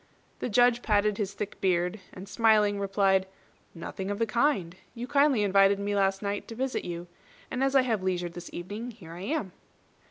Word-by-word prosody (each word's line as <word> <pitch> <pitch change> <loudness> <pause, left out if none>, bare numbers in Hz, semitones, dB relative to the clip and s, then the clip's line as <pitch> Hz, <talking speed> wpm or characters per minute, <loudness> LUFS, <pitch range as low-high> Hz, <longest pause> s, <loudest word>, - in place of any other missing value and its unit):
The - - -3
Judge 245 +2 +4
parted 210 -1 +1
his 200 -1 -2
thick 210 -1 -6
beard, 180 +1 +1
and 185 +2 -10
smiling, 210 -2 +3
replied, 195 -1 +2 0.5
"Nothing 190 +3 -6
of 205 - -2
the 230 - +1
kind. 220 - +1 0.2
You 240 +1 -5
kindly 280 -4 +3
invited 195 0 +4
me 205 +1 -2
last 195 0 +1
night 200 0 -3
to 225 - -8
visit 260 +2 -2
you; 175 0 -5 0.5
and 260 - -1
as 270 0 +1
I 265 - +6
have 225 -6 0
leisure 180 -2 -1
this 175 +1 -9
evening, 205 +7 -6
here 205 -9 -12
I 175 - -8
am." 260 - -2
205 Hz, 190 wpm, -28 LUFS, 190-230 Hz, 0.5 s, I